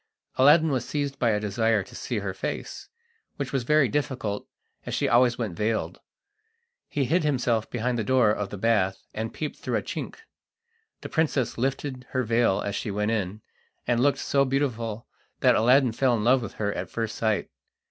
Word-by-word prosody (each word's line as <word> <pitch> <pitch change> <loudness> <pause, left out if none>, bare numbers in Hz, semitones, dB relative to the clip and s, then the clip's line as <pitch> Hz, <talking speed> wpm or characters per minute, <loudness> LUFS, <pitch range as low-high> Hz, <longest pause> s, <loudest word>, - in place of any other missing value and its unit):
Aladdin 150 +4 +6
was 130 -3 0
seized 140 +2 -3
by 120 - +3
a 105 -1 +2
desire 110 +1 +1
to - - -16
see 120 - -3
her 100 -2 -3
face, 95 - -5 0.5
which 140 -1 -4
was 135 - +1
very 145 +3 +3
difficult, 125 -5 -2 0.4
as - - -4
she - - +1
always 120 0 +4
went 110 -8 -3
veiled. 110 +4 -1 0.9
He 140 -2 0
hid 170 +7 +2
himself 125 -6 0
behind 120 0 -1
the - - 0
door 125 -2 +4
of 105 -2 -2
the 100 - -6
bath, 95 -3 +1
and 110 +1 -3
peeped 155 -2 -5
through - - -2
a - - -3
chink. - - -5 0.9
The - - -7
princess 150 -6 0
lifted 130 0 -3
her 130 - +1
veil 115 -3 +2
as 100 0 -3
she - - -3
went 105 +2 -1
in, 105 -1 -2 0.4
and 120 -1 +1
looked 140 +3 +3
so 140 -1 +2
beautiful 120 -5 -2 0.4
that - - +6
Aladdin 125 +2 +4
fell 120 +1 +2
in 105 - -2
love 125 +3 +4
with 110 - -6
her 100 -1 -2
at - - -5
first 115 -1 -3
sight. 110 -2 -1
120 Hz, 190 wpm, -26 LUFS, 110-135 Hz, 0.9 s, Aladdin